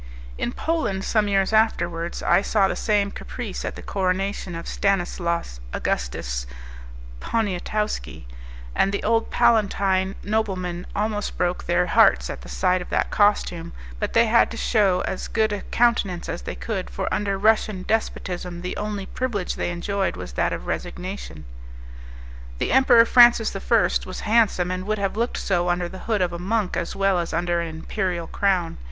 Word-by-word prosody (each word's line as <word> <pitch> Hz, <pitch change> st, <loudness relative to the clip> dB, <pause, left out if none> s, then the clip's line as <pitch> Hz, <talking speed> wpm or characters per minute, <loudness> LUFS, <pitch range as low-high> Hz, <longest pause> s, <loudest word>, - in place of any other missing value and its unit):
In -, -, -2 dB
Poland, 245 Hz, -12 st, -1 dB
some 215 Hz, 0 st, +1 dB
years 195 Hz, +1 st, +1 dB
afterwards, 175 Hz, -6 st, +1 dB
I -, -, +4 dB
saw 200 Hz, -1 st, +2 dB
the -, -, -2 dB
same 205 Hz, -2 st, +1 dB
caprice 220 Hz, -3 st, -6 dB
at -, -, -4 dB
the -, -, -9 dB
coronation 190 Hz, -1 st, -2 dB
of 165 Hz, -, -6 dB
Stanislas 175 Hz, -, -1 dB
Augustus -, -, -2 dB, 0.7 s
Poniatowski, 210 Hz, -, -2 dB, 0.5 s
and 195 Hz, -, +2 dB
the 200 Hz, -, -3 dB
old 225 Hz, +1 st, +1 dB
palatine 195 Hz, -3 st, +2 dB
noblemen 185 Hz, -5 st, -2 dB
almost 210 Hz, 0 st, -2 dB
broke 180 Hz, 0 st, -1 dB
their 175 Hz, +1 st, +2 dB
hearts 65 Hz, -, +4 dB
at -, -, -8 dB
the -, -, -11 dB
sight 180 Hz, -, +1 dB
of 180 Hz, -, -8 dB
that -, -, 0 dB
costume; 180 Hz, -5 st, +1 dB, 0.3 s
but -, -, -2 dB
they 230 Hz, +1 st, +5 dB
had 230 Hz, +1 st, +4 dB
to 230 Hz, -, -7 dB
shew 200 Hz, -6 st, +2 dB
as 190 Hz, -, -4 dB
good 220 Hz, -1 st, +1 dB
a 205 Hz, -, -3 dB
countenance 220 Hz, -7 st, +1 dB
as -, -, -4 dB
they -, -, -6 dB
could, 60 Hz, 0 st, -4 dB
for 60 Hz, -, -4 dB
under 200 Hz, -1 st, 0 dB
Russian 215 Hz, -2 st, +2 dB
despotism 180 Hz, -5 st, -2 dB
the 180 Hz, -, -3 dB
only 210 Hz, -2 st, -3 dB
privilege 210 Hz, -5 st, -2 dB
they -, -, -2 dB
enjoyed 190 Hz, +2 st, -2 dB
was -, -, -8 dB
that -, -, +1 dB
of -, -, -5 dB
resignation. 180 Hz, -, -5 dB, 1.1 s
The -, -, -1 dB
Emperor 245 Hz, -3 st, +6 dB
Francis 240 Hz, -3 st, +6 dB
I. 195 Hz, -, -4 dB, 0.4 s
was, 185 Hz, -, -7 dB
handsome, 210 Hz, -5 st, +2 dB
and 185 Hz, 0 st, -3 dB
would 215 Hz, 0 st, 0 dB
have 195 Hz, -1 st, -1 dB
looked 235 Hz, +2 st, -1 dB
so 175 Hz, -2 st, 0 dB
under 175 Hz, 0 st, 0 dB
the 190 Hz, +2 st, -9 dB
hood 210 Hz, -4 st, +2 dB
of 175 Hz, -1 st, -1 dB
a 170 Hz, -, -5 dB
monk 205 Hz, +1 st, -1 dB
as 170 Hz, -, -3 dB
well 195 Hz, -2 st, +2 dB
as 170 Hz, -1 st, -3 dB
under 175 Hz, 0 st, 0 dB
an 170 Hz, -, -3 dB
imperial 170 Hz, +2 st, -3 dB
crown. 185 Hz, -, 0 dB
195 Hz, 170 wpm, -23 LUFS, 175-215 Hz, 1.1 s, Emperor